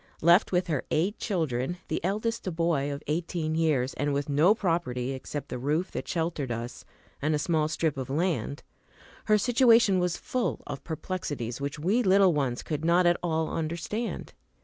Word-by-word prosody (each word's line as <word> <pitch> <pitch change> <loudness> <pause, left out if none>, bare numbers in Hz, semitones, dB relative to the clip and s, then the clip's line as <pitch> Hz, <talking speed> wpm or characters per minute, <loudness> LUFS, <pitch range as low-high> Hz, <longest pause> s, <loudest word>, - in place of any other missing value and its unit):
Left 170 +5 +5
with 180 -1 +2
her 155 -7 -1
eight 185 +8 0
children, 160 - -1
the 160 - -2
eldest 215 +4 -1
a - - 0
boy 160 -4 0
of 140 - -6
eighteen 160 0 -2
years, 150 -5 +1
and 145 0 -1
with 140 +1 -2
no 155 +9 +4
property 165 - -1
except 135 +2 -6
the 125 - -4
roof 150 +7 -1
that - - -5
sheltered 160 -6 -2
us 120 +1 -5 0.4
and 150 +2 +1
a - - +2
small 155 0 +1
strip 155 -2 -1
of 130 -1 -4
land, 155 -1 -1 0.6
her 215 -1 +4
situation 230 -3 +4
was 180 -1 0
full 255 -2 -2
of 140 -1 -6
perplexities 145 -8 -4
which 140 +1 -3
we 190 +11 +1
little 195 -3 +5
ones 135 -5 -1
could 155 -1 -3
not 175 +2 +4
at 175 0 +4
all 160 -2 -1
understand. 170 +8 -3
160 Hz, 175 wpm, -28 LUFS, 145-180 Hz, 0.6 s, Left